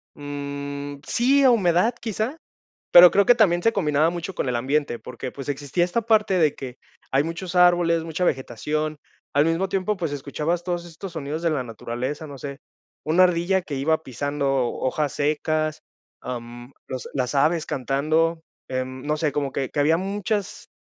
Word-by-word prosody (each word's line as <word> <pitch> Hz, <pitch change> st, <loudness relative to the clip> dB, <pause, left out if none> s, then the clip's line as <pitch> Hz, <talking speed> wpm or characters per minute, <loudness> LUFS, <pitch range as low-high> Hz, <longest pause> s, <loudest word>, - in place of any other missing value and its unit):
Mm, 140 Hz, 0 st, -6 dB
sí, 275 Hz, +4 st, +3 dB
a 265 Hz, -, +7 dB
humedad, 195 Hz, 0 st, +3 dB
quizá, 225 Hz, -, -3 dB, 0.6 s
pero 175 Hz, 0 st, +10 dB
creo 200 Hz, +4 st, +3 dB
que 245 Hz, -, +7 dB
también 180 Hz, -7 st, +3 dB
se 230 Hz, -, +3 dB
combinaba 155 Hz, -4 st, +2 dB
mucho 175 Hz, +2 st, -5 dB
con 135 Hz, -, -2 dB
el 125 Hz, -, 0 dB
ambiente, 135 Hz, 0 st, 0 dB
porque, 125 Hz, +3 st, -7 dB
pues, 140 Hz, +2 st, -6 dB
existía 145 Hz, +4 st, 0 dB
esta 180 Hz, +6 st, 0 dB
parte 215 Hz, -3 st, +3 dB
de 155 Hz, -4 st, +3 dB
que, 125 Hz, -2 st, -8 dB, 0.3 s
hay 135 Hz, +1 st, +4 dB
muchos 170 Hz, +3 st, -5 dB
árboles, 175 Hz, -2 st, +4 dB
mucha 165 Hz, +2 st, -2 dB
vegetación. 150 Hz, +3 st, -1 dB, 0.4 s
Al 145 Hz, +1 st, +4 dB
mismo 165 Hz, +4 st, +1 dB
tiempo, 195 Hz, +2 st, -1 dB
pues, 165 Hz, -5 st, -2 dB
escuchabas 150 Hz, +5 st, -2 dB
todos 175 Hz, -1 st, -3 dB
estos 170 Hz, +2 st, -9 dB
sonidos 155 Hz, 0 st, -4 dB
de 170 Hz, -, +2 dB
la 145 Hz, -4 st, 0 dB
naturaleza, 125 Hz, +6 st, -5 dB
no 140 Hz, -2 st, -9 dB
sé, 140 Hz, 0 st, -7 dB, 0.5 s
una 170 Hz, +4 st, +5 dB
ardilla 180 Hz, +2 st, +2 dB
que 155 Hz, -5 st, -6 dB
iba 160 Hz, +4 st, +1 dB
pisando 145 Hz, +1 st, -2 dB, 0.2 s
hojas 140 Hz, +2 st, -1 dB
secas, 155 Hz, +1 st, -1 dB, 0.4 s
am, 120 Hz, 0 st, -7 dB
los 130 Hz, -1 st, -6 dB
las 130 Hz, 0 st, -2 dB
aves 155 Hz, +3 st, +2 dB
cantando, 155 Hz, +5 st, 0 dB, 0.3 s
em, 130 Hz, 0 st, -4 dB
no 150 Hz, +1 st, 0 dB
sé, 155 Hz, -1 st, +1 dB
como 140 Hz, -1 st, -2 dB
que 135 Hz, -1 st, -2 dB
que -, -, -7 dB
había 160 Hz, +3 st, +3 dB
muchas 205 Hz, +1 st, -3 dB
155 Hz, 175 wpm, -24 LUFS, 140-175 Hz, 0.6 s, pero